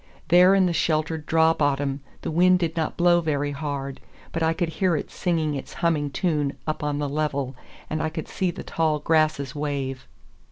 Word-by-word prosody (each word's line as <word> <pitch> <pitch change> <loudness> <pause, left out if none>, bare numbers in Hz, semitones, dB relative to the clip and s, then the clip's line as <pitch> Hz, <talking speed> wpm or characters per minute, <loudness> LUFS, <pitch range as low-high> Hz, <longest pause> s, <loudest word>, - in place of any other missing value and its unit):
There 180 +2 +7
in 190 -1 +4
the 175 - +1
sheltered 155 -1 0
draw 160 0 +4
bottom 140 -2 0 0.2
the - - -2
wind 180 +3 +5
did 170 -3 -2
not 160 -2 -2
blow 175 0 +4
very 145 -3 -1
hard, 140 -2 -4 0.3
but 165 - -3
I 160 0 +3
could 165 0 -1
hear 175 +1 +1
it 150 - -4
singing 160 -4 0
its 140 - -6
humming 155 -4 +1
tune 150 -3 -1
up 155 -1 -3
on 145 -1 -1
the 145 0 -1
level, 140 -2 -2 0.3
and 155 - -2
I 160 - 0
could 160 -1 -6
see 185 - -1
the 175 - -6
tall 160 -2 0
grasses 155 -3 +1
wave. 140 -3 -3
155 Hz, 195 wpm, -24 LUFS, 145-165 Hz, 0.3 s, There